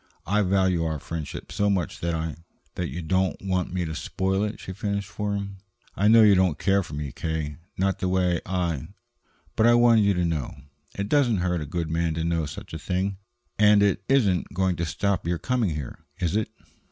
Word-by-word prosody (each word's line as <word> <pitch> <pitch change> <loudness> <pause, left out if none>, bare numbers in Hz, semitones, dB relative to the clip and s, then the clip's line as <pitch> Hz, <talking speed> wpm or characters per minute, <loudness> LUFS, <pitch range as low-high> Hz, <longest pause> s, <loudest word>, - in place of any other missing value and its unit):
I 105 +5 +2
value 95 -3 +2
our 80 -1 -1
friendship 80 +1 -6
so 100 0 +1
much 95 -5 -1
that 85 -1 -1
I 80 -1 -3 0.2
" - - -41
"That - - -3
you 85 +6 -5
don't 95 +3 0
want 95 -2 -1
me 90 -1 -1
to 80 - -4
spoil 95 +5 -1
it," 105 +1 -3
she 95 - -7
finished 100 0 -2
for 105 0 -3
him. 100 -1 -5 0.4
"I 100 - +2
know 115 +1 +8
you 105 -1 +7
don't 90 -5 +3
care 100 +3 +2
for 85 -5 -7
me, 75 -2 -4
K., 80 -1 -3 0.2
not 95 +1 0
the 95 - 0
way 90 -2 +1
I 85 -7 -2 0.7
But 110 - +4
I 120 - +6
wanted 120 -2 +6
you 100 -1 +3
to 90 0 +1
know. 80 -6 -2 0.4
It 100 0 -2
doesn't 125 -4 +3
hurt 90 -2 0
a 75 - -5
good 85 0 -3
man 80 -1 0
to 80 - -2
know 85 -2 0
such 70 - -9
a 80 - -4
thing. 95 +3 -2 0.4
And 105 -1 +6
it 100 -2 +1
isn't 105 -10 +2
going 95 -1 +1
to 85 - -1
stop 95 +3 -1
your 85 0 0
coming 115 -6 0
here, 75 -5 -6 0.2
is 90 0 -1
it?" 110 0 0
95 Hz, 215 wpm, -25 LUFS, 85-100 Hz, 0.7 s, know